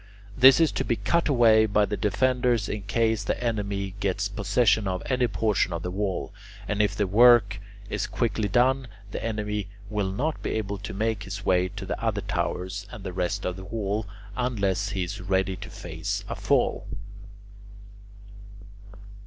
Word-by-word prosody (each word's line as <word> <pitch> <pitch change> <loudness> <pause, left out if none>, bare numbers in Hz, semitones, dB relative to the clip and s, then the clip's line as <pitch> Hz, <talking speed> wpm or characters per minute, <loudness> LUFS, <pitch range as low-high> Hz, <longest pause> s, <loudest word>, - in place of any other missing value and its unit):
This 130 +2 +8
is 165 -3 +4
to - - -1
be 115 - 0
cut 170 +6 +1
away 110 -5 +5
by 105 0 +3
the 105 - -3
defenders 120 +1 +1
in 105 - -3
case 110 +2 0
the - - -2
enemy 100 -4 -2
gets 100 0 -1
possession 105 +1 +2
of 90 -1 -2
any 125 -2 +1
portion 105 0 +1
of 85 +1 -4
the 90 - -3
wall; 95 -1 -2 0.3
and 105 0 +1
if 105 -1 +1
the 105 - +1
work 105 -1 +5 0.3
is - - -2
quickly 105 - -1
done, 130 +5 +2 0.2
the - - -5
enemy 105 -2 -2 0.2
will 100 -3 -1
not 150 +11 -2
be - - -2
able 100 -2 -3
to 100 - -6
make 110 0 -1
his 100 +1 -6
way 90 0 +3
to - - -8
the - - -4
other - - 0
towers 95 +1 -3
and 105 - -9
the 95 - -5
rest 90 -1 -2
of 90 0 -2
the 95 - -8
wall 105 0 -2 0.3
unless 105 -5 0
he 95 -2 -2
is 95 +3 -5
ready 95 0 0
to - - -9
face - - -5
a - - -3
fall. - - +1
105 Hz, 175 wpm, -26 LUFS, 95-115 Hz, 0.3 s, This